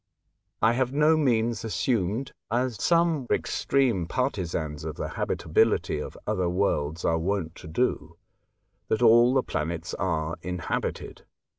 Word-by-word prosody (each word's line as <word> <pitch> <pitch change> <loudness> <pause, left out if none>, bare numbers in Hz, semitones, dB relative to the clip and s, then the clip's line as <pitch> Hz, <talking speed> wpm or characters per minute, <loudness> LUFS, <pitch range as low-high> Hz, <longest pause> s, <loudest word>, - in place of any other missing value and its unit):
I 110 +2 +5
have 130 +1 0
by - - -4
no 155 +2 +5
means 120 -6 +1
assumed, 115 +1 -1 0.2
as 120 -1 -1
some 165 -6 +2
extreme 120 -11 +1
partisans 85 - -2
of 80 -1 -5
the - - -4
habitability - - +1
of - - -7
other 90 -1 0
worlds 85 -4 -1
are 80 0 +2
w^ont 85 -2 -2
to - - -10
do, 80 -3 -1 0.7
that 110 - 0
all 120 +2 +6
the 130 - +3
planets 80 +2 -3
are 80 -3 -2
inhabited. 90 -1 -4
105 Hz, 135 wpm, -26 LUFS, 85-125 Hz, 0.7 s, all